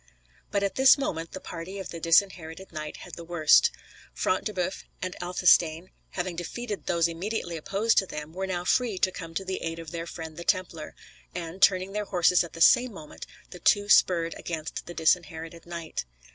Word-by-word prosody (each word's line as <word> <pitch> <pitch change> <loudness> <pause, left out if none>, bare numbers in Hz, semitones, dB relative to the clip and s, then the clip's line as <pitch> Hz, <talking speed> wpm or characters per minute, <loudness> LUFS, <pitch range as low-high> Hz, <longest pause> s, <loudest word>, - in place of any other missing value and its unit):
But 200 -1 0
at 200 - -2
this 265 +2 +7
moment 165 -12 -3
the 190 - -5
party 180 +2 -7
of 195 - -6
the 170 - -6
Disinherited 165 +1 +1
Knight 155 -2 -6
had - - -13
the 170 - -7
worst. 170 - +5 0.5
Front - - 0
de 215 - -1
Boeuf 185 -1 -3 0.2
and 185 -1 -4
Athelstane, 175 -1 +3 0.2
having 180 -1 -3
defeated 205 +5 -5
those 170 -1 +2
immediately 175 +1 -4
opposed 200 +8 +2
to 190 - -3
them, 150 0 -7
were 190 +2 -3
now 180 -1 -3
free 230 -1 +1
to 185 0 +2
come 165 -3 -8
to 195 - -2
the 190 0 -3
aid 165 0 -4
of 165 -2 -8
their 170 0 -5
friend 160 -2 -8
the 170 - -6
Templar; 170 -4 -1 0.4
and, 175 +1 -6
turning 185 0 +4
their 210 +1 -2
horses 180 -2 +3
at 170 - -10
the 165 - -8
same 245 +7 +6
moment, 155 -7 -10 0.2
the 180 - -9
two 205 +3 +3
spurred 170 -4 +4
against 160 -2 -5
the 175 - -8
Disinherited 165 0 0
Knight. 170 - -5
175 Hz, 195 wpm, -27 LUFS, 165-190 Hz, 0.5 s, this